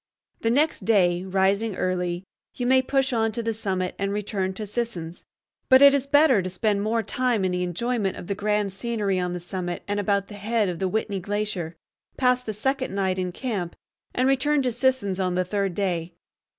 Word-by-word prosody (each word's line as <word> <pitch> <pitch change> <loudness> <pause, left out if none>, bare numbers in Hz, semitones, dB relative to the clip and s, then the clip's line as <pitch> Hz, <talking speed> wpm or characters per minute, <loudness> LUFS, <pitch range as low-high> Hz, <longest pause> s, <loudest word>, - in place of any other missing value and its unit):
The 225 - 0
next 295 +7 +2
day, 180 -5 +3
rising 195 +3 +1
early, 180 -1 -1 0.3
you 245 - -3
may 260 +1 +5
push 270 0 0
on 225 -1 +1
to 235 +1 -3
the 225 0 -1
summit 190 -4 -2
and 200 0 -1
return 200 -2 -2
to 215 - -5
Sisson's. 200 -7 -4 0.4
But 260 +1 +8
it 280 0 +9
is 275 -1 0
better 285 -6 +5
to 185 - -4
spend 200 +2 0
more 225 +2 0
time 240 -2 0
in 185 - +1
the 180 0 -1
enjoyment 195 +3 -1
of - - -8
the 200 - -2
grand 210 0 0
scenery 200 -1 -1
on 180 -1 -1
the 180 - -3
summit 175 0 -5
and 205 0 -1
about 200 0 +1
the - - -11
head 210 0 0
of 175 - -4
the 190 - 0
Whitney 200 0 -1
Glacier, 200 -4 -3 0.4
pass 250 -1 +3
the 225 - -4
second 260 +1 -2
night 190 -1 0
in 180 -1 -2
camp, 195 -5 -4 0.4
and 255 +1 +1
return 275 +2 +2
to 250 - +1
Sisson's 240 -6 0
on 185 -1 0
the 185 0 +1
third 195 -1 -1
day. 175 -4 -2
205 Hz, 205 wpm, -25 LUFS, 185-235 Hz, 0.4 s, it